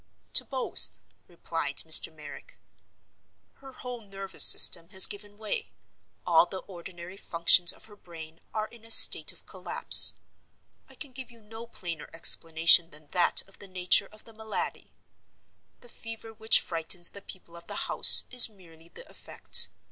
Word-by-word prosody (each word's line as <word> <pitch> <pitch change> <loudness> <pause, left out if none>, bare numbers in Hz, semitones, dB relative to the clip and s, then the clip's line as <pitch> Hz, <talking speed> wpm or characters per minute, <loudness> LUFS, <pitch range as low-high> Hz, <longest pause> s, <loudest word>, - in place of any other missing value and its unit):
"To - - +5
both," 260 -2 -6 0.3
replied - - -9
Mr. - - +4
Merrick. - - -17 1.0
"Her 270 -1 -17
whole 250 -2 -13
nervous 195 -2 -4
system 170 0 +5
has 190 -1 +6
given 205 0 -13
way; 205 - -9 0.5
all 175 0 0
the 190 - -11
ordinary 175 0 -15
functions 170 -1 0
of - - -12
her 210 -2 -17
brain 165 -4 -16
are 215 0 -7
in 235 -2 -21
a 225 - -15
state - - +5
of - - -14
collapse. - - +3 0.7
I - - -17
can 285 - -12
give 260 0 -11
you 235 -1 -19
no 225 +2 -15
plainer 170 -8 -11
explanation 165 +1 +1
than 150 -1 -18
that 180 0 -2
of 195 - -21
the 200 - -15
nature 185 +1 0
of 215 - -20
the 225 - -20
malady. 220 0 -10 0.9
The 245 - -19
fever 225 -1 -14
which 220 0 +1
frightens 170 +1 -5
the 200 - -13
people 180 -3 -17
of 170 0 -17
the - - -11
house - - +3
is 250 -2 +6
merely 170 -5 -23
the - - -16
effect. - - -2
195 Hz, 160 wpm, -23 LUFS, 170-225 Hz, 1.0 s, has